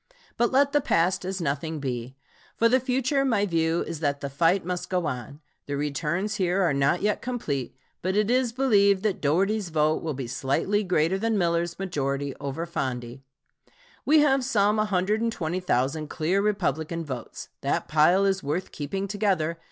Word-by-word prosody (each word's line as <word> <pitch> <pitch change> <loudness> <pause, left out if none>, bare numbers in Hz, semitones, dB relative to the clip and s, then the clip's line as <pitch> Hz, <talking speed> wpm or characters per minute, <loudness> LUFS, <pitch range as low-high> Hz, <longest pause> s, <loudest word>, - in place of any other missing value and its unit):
But 240 - +1
let 280 +2 +3
the 290 0 +3
past 180 -5 +1
as 190 0 -3
nothing 155 0 -2
be. 125 -2 -4 0.4
For 230 - +4
the 255 +3 +4
future 265 +2 0
my 225 -7 +2
view 165 -2 +1
is 165 -2 -6
that 145 -2 -1
the 140 -1 -5
fight 165 +6 +2
must 180 0 -3
go 180 -2 0
on. 140 +2 -5 0.3
The 145 -1 -2
returns 165 +8 -2
here 185 0 +1
are 170 - +2
not 140 +6 +1
yet 210 0 +1
complete, 145 - -3 0.2
but 185 +2 -1
it 210 +2 +2
is 250 -1 +2
believed 200 -6 +3
that 215 -3 -1
Dougherty's 190 +6 +1
vote 155 -1 +1
will 155 -3 -3
be 130 -1 -4
slightly 140 - 0
greater 180 0 +1
than 225 0 0
Miller's 170 -1 0
majority 140 -7 -2
over 145 +4 -4
Fondey. 125 -5 -4 0.8
We 305 +1 +5
have 270 -3 +3
some 210 -4 +2
120,000 180 - 0
clear 175 +5 0
Republican 165 -5 -1
votes. 130 -4 -7
That - - -1
pile 165 +6 +4
is 190 -1 +1
worth 160 +6 -3
keeping 190 +7 -4
together. 185 -6 0
175 Hz, 165 wpm, -26 LUFS, 150-210 Hz, 0.8 s, We